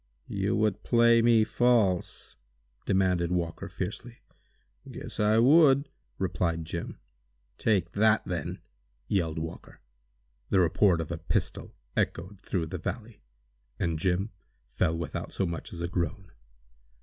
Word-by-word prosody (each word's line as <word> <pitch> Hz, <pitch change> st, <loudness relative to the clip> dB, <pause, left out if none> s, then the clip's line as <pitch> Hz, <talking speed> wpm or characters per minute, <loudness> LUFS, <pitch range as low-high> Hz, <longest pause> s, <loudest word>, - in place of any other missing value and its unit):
"You 100 Hz, +1 st, -1 dB
would 105 Hz, -2 st, +1 dB
play 115 Hz, -1 st, +4 dB
me 115 Hz, -1 st, +5 dB
false!" 110 Hz, -7 st, +1 dB, 0.5 s
demanded 90 Hz, -3 st, +2 dB
Walker, 85 Hz, -2 st, -2 dB
fiercely. -, -, -6 dB, 0.7 s
"Guess -, -, -8 dB
I 105 Hz, +1 st, +3 dB
would!" 140 Hz, +2 st, +5 dB, 0.3 s
replied 85 Hz, -3 st, -1 dB
Jim. 85 Hz, +1 st, -5 dB, 0.6 s
"Take 95 Hz, -6 st, +1 dB
that, 110 Hz, +2 st, +3 dB
then!" -, -, -4 dB, 0.5 s
yelled 80 Hz, -5 st, 0 dB
Walker. 80 Hz, 0 st, -7 dB, 0.7 s
The 95 Hz, -, +3 dB
report 90 Hz, 0 st, +3 dB
of 80 Hz, -, -6 dB
a 85 Hz, -, -4 dB
pistol 85 Hz, -, -3 dB, 0.2 s
echoed 90 Hz, +3 st, -2 dB
through 90 Hz, -5 st, -2 dB
the 85 Hz, +3 st, -6 dB
valley, 110 Hz, +3 st, -6 dB, 0.6 s
and 80 Hz, -2 st, -1 dB
Jim 95 Hz, +5 st, 0 dB, 0.3 s
fell 85 Hz, -2 st, -1 dB
without 85 Hz, -, -5 dB
so 95 Hz, -, 0 dB
much 85 Hz, -1 st, -5 dB
as 85 Hz, -, -7 dB
a 85 Hz, -, -1 dB
groan. 90 Hz, +2 st, -3 dB
95 Hz, 125 wpm, -28 LUFS, 85-110 Hz, 0.7 s, me